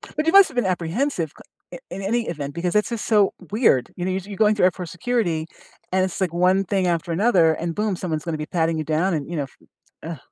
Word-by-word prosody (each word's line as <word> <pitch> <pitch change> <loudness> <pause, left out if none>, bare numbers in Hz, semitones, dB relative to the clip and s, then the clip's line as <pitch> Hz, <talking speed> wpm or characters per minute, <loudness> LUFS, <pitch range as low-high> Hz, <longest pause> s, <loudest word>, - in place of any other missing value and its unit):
But, 305 - -1
you 325 - +3
must've 395 -9 +7
been 245 - +1
apprehensive 180 - -1
c - - -18 0.3
i - - -7
in 195 - -6
any 230 +4 -1
event, 145 -4 -5
because 175 +2 -2
it's 210 +2 +2
just 235 -2 -4
so 210 -3 +3 0.2
weird, 205 - +2
you 175 - -3
know, 185 - 0
you 190 - -1
you're 200 - -7
going 215 -1 +4
through 200 - +3
airport 180 -1 0
security, 175 -5 -1 0.4
and 185 0 +2
it's, 190 +1 -5
like, 180 -3 0
one 185 +3 +3
thing 190 -1 0
after 170 0 -1
another, 175 -3 +4
and 165 +1 -4
boom, 210 -2 0
someone's 165 -4 -3
gonna 165 -2 -2
be 150 - -4
patting 165 0 0
you 155 - -2
down 160 +5 0
and, 145 -1 -4
you 175 - -4
know, 145 - 0
f 135 - -12 0.5
ugh. 165 0 -5
180 Hz, 250 wpm, -22 LUFS, 165-210 Hz, 0.5 s, must've